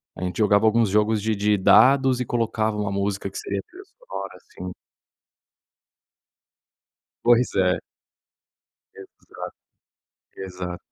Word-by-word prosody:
A - - -7
gente 90 0 -4
jogava 105 0 +3
alguns 115 -1 +3
jogos 105 +1 +2
de 110 0 0
de 105 +1 +1
dados 130 +6 +5
e 125 - -2
colocava 110 -2 -1
uma 105 -2 -2
música 100 0 -2
que - - -8
seria 100 -1 -3
trilha 380 +2 -13
sonora, - - -9
assim. 90 0 -9 2.5
Pois 120 +1 +3
é. 90 -1 +2 1.2
Exato, 95 - -11 0.8
exato. 90 -2 -6
105 Hz, 115 wpm, -23 LUFS, 95-115 Hz, 2.5 s, dados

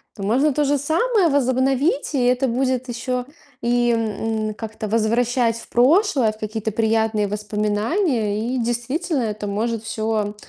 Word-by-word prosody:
То 200 - -7
можно 265 +8 +2
то 295 +1 +1
же 285 +1 +2
самое 345 - +2
возобновить, 270 - +1
и 255 - +2
это 250 +2 +2
будет 255 +1 -1
еще 250 +1 -3 0.4
и, 240 0 +2
м, 220 -1 -1
как-то 220 -1 -6
возвращать 230 +1 +1
в - - -12
прошлое, 270 - +3
в - - -16
какие-то 220 0 -3
приятные 220 -1 +1
воспоминания. 215 - -1
И - - 0
действительно, 255 +5 -1
это 210 -1 -3
может 225 +2 -2
всё 215 -2 -2
235 Hz, 145 wpm, -21 LUFS, 220-265 Hz, 0.4 s, прошлое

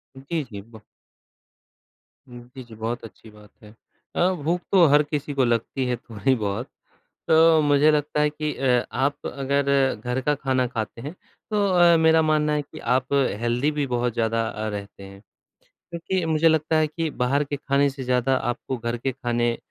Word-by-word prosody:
जी, 145 +4 -4
जी। 105 -6 -9 1.7
जी, 125 +2 -11
जी 115 -2 -14
बहुत 115 +3 -4
अच्छी 110 +1 -13
बात 105 0 -17
है। 105 +1 -14 0.4
अ, 180 +2 +3
भूख 175 +3 0
तो 185 -4 +6
हर 150 +1 +6
किसी 145 -1 -4
को 135 -2 +2
लगती 120 +3 -1
है 125 -1 0
थोड़ी 115 +3 -1
बहुत 110 +3 -3 0.6
तो 160 0 +5
मुझे 145 +1 +4
लगता 150 0 0
है 150 - +3
कि 150 0 -4
अ, 125 -2 +1
आप 140 +2 0
अगर 140 +1 -1 0.3
घर 125 +4 -3
का 150 +3 +1
ख़ाना 130 -2 0
ख़ाते 115 -1 -5
हैं। 145 +6 -6 0.4
तो 205 -1 +2
अ, 175 -2 +5
मेरा 160 0 +4
मानना 155 -1 +1
है 150 - 0
कि 145 - -12 0.2
आप 130 +2 -1 0.3
हेल्दी 125 +6 +1
भी 145 -1 -1
बहुत 120 -1 -1
ज़्यादा 115 -1 0
अ, 110 0 -4
रहते 100 -1 -8
हैं। 100 0 -12 0.7
क्योंकि 170 +1 -2
मुझे 160 +1 +3
लगता 160 0 +1
है 155 0 +3
कि 160 +1 -3
बाहर 140 +4 +1
के 145 0 -4
ख़ाने 140 +1 +1
से 135 -1 -8
ज़्यादा 125 +1 +1 0.2
आपको 130 +1 -6
घर 120 +1 -3
के 130 +2 -3
ख़ाने 120 -2 -1
135 Hz, 180 wpm, -23 LUFS, 120-150 Hz, 1.7 s, तो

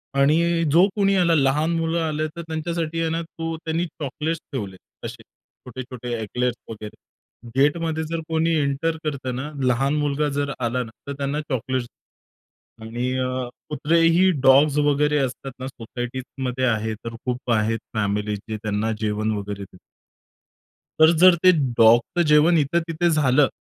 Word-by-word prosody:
आणि 165 +4 +3
जो 175 +5 +6
कोणी 195 -1 +2
आला, 170 -3 +3
लहान 150 +3 +2
मुलं 165 +1 0
आले, 155 -1 -1
तर 170 +2 -8
त्यांच्यासाठी 165 0 -3
आहे 165 - 0
ना 165 +1 -1
तू 165 0 -5
त्यांनी 165 +2 0
चॉकलेट्स 155 +1 -4
ठेवले, 100 -8 -4 0.3
असे - - -8
छोटे-छोटे 125 -1 -9
एक्लेयर्स 125 +3 -1
वगैरे. 105 -1 -8 0.6
गेटमध्ये 160 +3 +1
जर 165 +1 -3
कोणी 165 +1 +1
एंटर 145 +4 -1
करतं 135 -4 -3
ना, 145 +4 -5 0.2
लहान 135 +4 +1
मुलगा 145 0 0
जर 140 -1 -1
आला 125 +1 -1
ना, 110 - -11 0.2
तर 140 - -3
त्यांना 140 +2 -2
चॉकलेट्स 130 -1 -2 1.0
आणि 120 +3 -3
अ, 130 - 0 0.4
कुत्रे 155 +2 +1
ही 175 +3 +5
डॉग्स 140 +3 +5
वगैरे 150 0 +2
असतात 135 0 -3
ना 130 - -5
सोसायटीजमध्ये 125 +1 -5
आहे, 110 -2 0
तर 115 0 -6
खूप 125 -1 -3
आहेत 110 +1 +1 0.2
फॅमिली, 105 0 -1
जे 110 +2 -6
त्यांना 110 +1 -1
जेवण 110 0 -1
वगैरे 100 0 -5
देतात. 90 -1 -12 1.2
तर 160 +1 +8
जर 185 -1 +8
ते 185 - +8 0.3
डॉगचं 120 +9 +5
जेवण 155 +3 +5
इथं 150 +3 +2
तिथे 170 +1 +1
झालं, 145 -3 +3
140 Hz, 155 wpm, -23 LUFS, 120-160 Hz, 1.2 s, तर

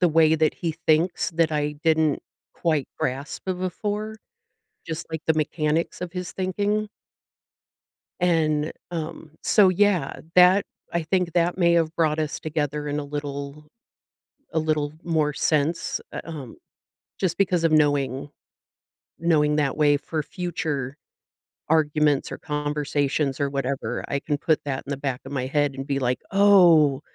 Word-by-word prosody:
the 180 - +5
way 160 0 +4
that 155 -1 +2
he 165 -2 -2
thinks, 165 +4 +2
that 165 -1 +2
I 150 0 0
didn't 160 -2 +2 0.3
quite 155 -5 0
grasp 135 +3 -3
b 190 - +1
before, 205 +4 -3 0.7
just 160 -1 -5
like 160 -1 -4
the 160 - +3
mechanics 155 +1 -1
of 180 -1 -5
his 180 -1 -5
thinking 205 +3 -1 1.3
and, 160 -4 +2 0.2
um 160 -1 -5
so, 200 -3 +5
yeah, 185 -6 +1 0.2
that, 180 +2 +6 0.3
I 170 -1 0
think 180 0 0
that 175 0 +1
may 170 -2 +4
have 165 -1 +1
brought 155 -2 +1
us 155 -1 -2
together 150 -1 -2
in 145 +1 -1
a - - -4
little 145 0 -6 0.9
a 160 - +2
little 155 -2 0
more 155 -3 +1
sense, 155 +2 0
eh, - - -5
um, 145 -8 -8 0.6
just 175 -3 0
because 180 -3 +2
of 165 - +3
knowing 145 -3 +2 0.9
knowing 150 -3 +2
that 145 -3 0
way 145 -1 +4
for 155 +2 -3
future 150 -7 -3 0.7
arguments, 150 -2 +2
or - - -6
conversations, 145 -1 -1
or 140 - +1
whatever, 135 -4 -2
I 140 - 0
can 145 0 -2
put 155 0 +2
that 135 -2 -3
in - - -7
the 140 - -1
back 135 -2 -3
of 135 - -9
my 130 -2 -2
head 145 0 +1
and 135 +1 -5
be 140 -1 0
like, 125 -1 0
"Oh, 175 -8 +6
155 Hz, 155 wpm, -24 LUFS, 145-170 Hz, 1.3 s, that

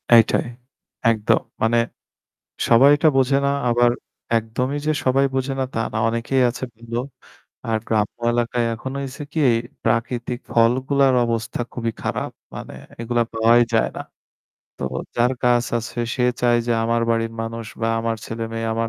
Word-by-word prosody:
এইটাই। 115 +1 +4 0.7
একদম 110 -2 +2 0.2
মানে 115 +1 +3 0.9
সবাইটা 140 +6 +6
বোঝে 135 +1 +3
না - - +3 0.2
আবার 120 0 +4 0.5
একদমই 125 +5 -2
যে - - +4
সবাই 135 +1 +3
বোঝে 135 +1 -1
না - - +2
তা 115 - -1
না। - - -1
অনেকেই 115 +3 0
আছে 120 +2 -7
ভালো। 115 +1 -6 0.7
আর 110 - +1
গ্রাম্য 105 -1 0 0.2
এলাকায় 120 0 0
এখনো 130 +4 -5
হইছে 135 +2 -7
কি 160 - -1 0.4
প্রাকৃতিক 120 +1 -1
ফলগুলার 130 +4 +3
অবস্থা 115 -1 -2
খুবই 115 -2 -2
খারাপ। - - -2 0.2
মানে - - -8 0.3
এগুলা 120 0 +1
পাওয়াই 115 +2 +5
যায় 115 - +3
না। - - -3 0.8
তো - - -8 0.3
যার 120 +2 +3
গাছ 120 -1 +3
আছে 120 +1 -7 0.2
সে 125 - 0 0.2
চায় 120 -1 +4
যে 120 - +2
আমার 115 0 +1
বাড়ির 115 0 0
মানুষ 115 0 -5
বা 115 - +1
আমার 115 0 -1
ছেলেমেয়ে 115 0 -4
আমার 115 0 -1
120 Hz, 150 wpm, -22 LUFS, 115-125 Hz, 0.9 s, সবাইটা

